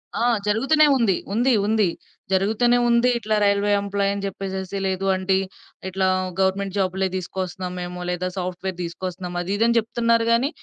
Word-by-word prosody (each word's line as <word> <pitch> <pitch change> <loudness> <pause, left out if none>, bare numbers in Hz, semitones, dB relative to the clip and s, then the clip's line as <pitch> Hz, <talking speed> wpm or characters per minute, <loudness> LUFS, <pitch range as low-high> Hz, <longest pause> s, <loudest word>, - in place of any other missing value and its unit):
ఆ! 235 - +1 0.2
జరుగుతూనే 270 +9 +4
ఉంది. 220 -7 +2 0.2
ఉంది. 245 +4 +3
ఉంది. 215 -3 +3 0.4
జరుగుతునే 220 +6 +3
ఉంది. 235 +1 +4
ఇట్లా 215 -1 -1
రైల్వే 200 0 +2
ఎంప్లాయని 200 0 -1
జెప్పేసేసి 190 0 -4
లేదు 190 0 -1
ఆంటీ, 190 0 +1 0.5
ఇట్లా 190 0 0 0.3
గవర్నమెంట్ 190 +1 0
జాబ్‌లే 190 0 0
దీసుకొస్తున్నాం 185 0 -5
మేము. 180 0 -6
లేదా 180 +1 -2
సాఫ్ట్‌వేర్ 185 0 -4
దీసుకొస్తున్నాం 180 +1 -5
అది 175 +2 -4
ఇదని 235 +2 +3
జెప్తున్నారు 230 0 +1
గానీ 245 +5 +3
195 Hz, 140 wpm, -23 LUFS, 185-225 Hz, 0.5 s, జరుగుతూనే